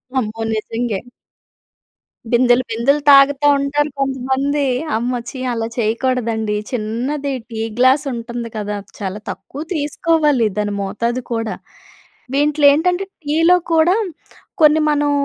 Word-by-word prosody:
అమ్మో! 225 -3 -2
నిజంగే. 225 -1 -2 1.3
బిందెలు, 245 +1 +4
బిందెలు 260 +6 +1
తాగుతా 280 +1 +6
ఉంటారు 290 +2 0
కొంతమంది. 270 +2 0 0.3
అమ్మ! 245 +2 -2
ఛీ 265 - -8
అలా 230 -1 -2
చేయకూడదండి 225 -2 0 0.2
చిన్నది 250 +5 -2 0.2
టీ 220 -1 -5 0.2
గ్లాస్ 260 +4 +4
ఉంటుంది 235 0 -5
కదా! 210 -1 -3 0.2
చాలా 195 0 -4
తక్కువ 285 - -9
తీసుకోవాలి 300 -4 +1
దాని 205 -1 -1
మోతాదు 235 +6 -2
కూడా, 225 -1 -2 0.8
వింట్లో 295 +1 +2
ఏంటంటే 360 +5 +1 0.2
టీలో 330 +5 +4 0.2
కూడా 330 +3 +4 0.7
కొన్ని 305 +1 +6
మనం 290 0 +1
255 Hz, 110 wpm, -18 LUFS, 225-290 Hz, 1.3 s, తాగుతా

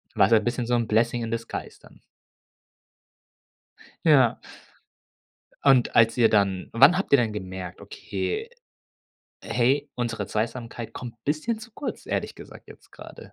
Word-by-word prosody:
War 95 - +4
so 115 - +6
'n 110 - -1
bisschen 120 0 -2
so 120 - +2
'n 120 -1 +1
blessing 120 +2 +1
in 115 - -4
the 115 - 0
skies, 115 - -8
dann. - - -19 2.0
Ja. - - +4 1.3
Und 135 -3 +4
als 115 0 +4
ihr 115 -2 +5
dann 100 -3 +1
Wann 140 +9 +6
habt 195 - -3
ihr - - +9
denn 115 -4 +1
gemerkt: 95 -3 -7
„Okay, 435 +1 -5 0.9
hey, 135 +4 +1
unsere 115 -4 -3
Zweisamkeit 115 +2 -4
kommt 120 -2 -8
bisschen 155 +11 -1
zu 240 +1 -11
kurz, 285 - -6
ehrlich - - -3
gesagt, - - -13
jetzt - - -16
grade?“ - - -13
120 Hz, 150 wpm, -25 LUFS, 110-135 Hz, 2.0 s, ihr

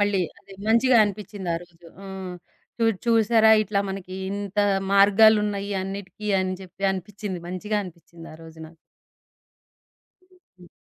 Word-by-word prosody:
మళ్ళీ 205 -2 +2 0.2
అది 195 - -17 0.2
మంచిగా 235 +2 +4
అనిపించింది 205 -2 -6
ఆ - - -1
రోజు. 175 -1 -19 0.3
ఆ! - - -10 0.8
చు - - +1
చూడు 215 -5 +1
చూసారా, 225 -1 +4
ఇట్లా 205 -1 -1
మనకి 190 -1 -7 0.2
ఇంత 200 0 -5 0.3
మార్గాలున్నాయి 205 0 +4
అన్నిటికి 195 +1 -7
అని 185 0 -1
జెప్పి 190 +1 -8
అనిపించింది. 190 0 -6
మంచిగా 210 +4 -3
అనిపించింది 170 -1 -13
ఆరోజు 160 0 -13
నాకు. 160 - -17 1.5
హుహు. 360 - -22
200 Hz, 130 wpm, -24 LUFS, 185-210 Hz, 1.5 s, మంచిగా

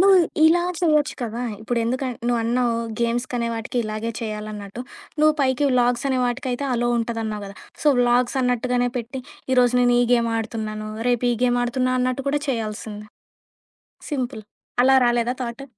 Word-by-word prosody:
నువు 390 +1 +7 0.3
ఇలా 345 +2 +5 0.2
చేయొచ్చు 305 -4 +2
కదా! 230 +1 -4 0.2
ఇప్పుడెందుకని 240 +3 -1
నువన్నావు 235 0 +1 0.2
గేమ్స్‌కనే 235 0 -1
వాటికి 225 +2 -5
ఇలాగే 215 +2 -3
చేయాలన్నట్టు. 210 0 -6 0.4
నువ్వు 310 0 +5
పైకివి 270 +1 +2
వ్లాగ్స‌నే 245 +2 +2
వాటికయితే 250 +2 -2
అలో 240 0 +1
ఉంటదన్నావు 225 -2 -3
గదా! 195 - -11 0.3
సో 300 - +4
వ్లాగ్స‌న్నట్టుగానే 245 0 +2
పెట్టి 250 +3 -5 0.3
ఈ - - +2
రోజు 245 0 +3
నేను 245 0 +4
ఈ - - +4
గేమ్ 235 -1 +3
ఆడుతున్నాను, 215 -1 -4 0.2
రేపు 245 0 +1
ఈ - - 0
గేమ్ 245 0 +2
ఆడుతున్నా, 255 +1 0
అన్నట్టు 255 +2 -1
కూడా 290 +1 +1
చేయాల్సింది. 215 -3 -4 1.0
సింపుల్. 255 -6 -3 0.4
అలా 265 +1 +6
రాలేదా 240 +1 +1
థాట్? 240 +3 -5
245 Hz, 140 wpm, -23 LUFS, 230-255 Hz, 1.0 s, నువు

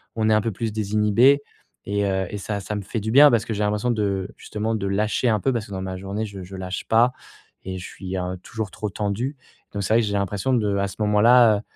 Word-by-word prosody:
on 110 -1 +1
est - - +4
un 105 - +3
peu 115 +1 -2
plus 110 +2 -3
désinhibé 110 +6 +3 0.4
et 100 0 0
heu, 95 -1 0
et 105 - -5
ça 100 +1 -3
ça 105 +2 -4
me 105 - -3
fait 105 +4 -4
du 110 - -3
bien 145 +4 +8
parce 115 -3 +2
que 115 - -3
j'ai 105 - -1
l'impression 105 +3 0
de 100 -4 -1
justement, 110 +1 -3
de 100 -3 -3
lâcher 105 +5 +1
un 110 -2 +2
peu 135 - +1
parce 115 -3 -2
que - - -14
dans 95 -1 -4
ma 95 -1 -4
journée, 100 +3 -4
je 100 -2 -8
je 95 +2 -10
lâche 95 0 -5
pas 115 +2 +4 0.5
et 95 0 -5
je - - -8
suis 95 -1 -6
un, 90 0 -2
heu, - - -9
toujours 110 -3 -5
trop 105 - -4
tendu. 105 +9 -2 0.4
Donc 100 - -3
c'est 110 - 0
vrai 115 - +5
que - - 0
j'ai 100 - -2
l'impression 100 +5 -1
de 105 -5 +1
à 100 0 0
ce 95 - -9
moment-là, 110 +2 +5
heu, - - -8
105 Hz, 270 wpm, -23 LUFS, 100-110 Hz, 0.5 s, bien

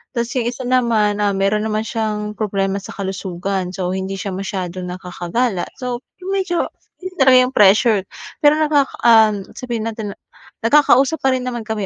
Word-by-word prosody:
tas 235 0 -1
yung 245 -3 -1
isa 255 +2 -7
naman, 230 -5 +2
ah, 200 -1 +1
meron 195 +2 +1
naman 215 0 -1
siyang 215 -3 -3
problema 195 -2 -1
sa - - -10
kalusugan, 190 -1 -3
so 180 -1 -2
hindi 190 +1 -3
siya 195 -1 -4
masyadong 185 -2 -4
nakakagala. 180 +4 -2
So 250 -2 -4 0.2
medyo 380 -2 -1 0.4
yun 370 0 -6
talaga 260 -1 +7
yung 255 - -6
pressure 210 +1 +5 0.4
pero 295 +1 +5
naka, 295 -3 +3 0.2
ah, 220 -2 +7 0.3
sabihin 235 -4 -4
natin 215 -3 -6 0.5
nagkakausap 280 +3 +4
pa 270 - +4
rin 250 -1 -3
naman 240 -2 -3
kami 215 -2 -3
215 Hz, 160 wpm, -19 LUFS, 195-250 Hz, 0.5 s, talaga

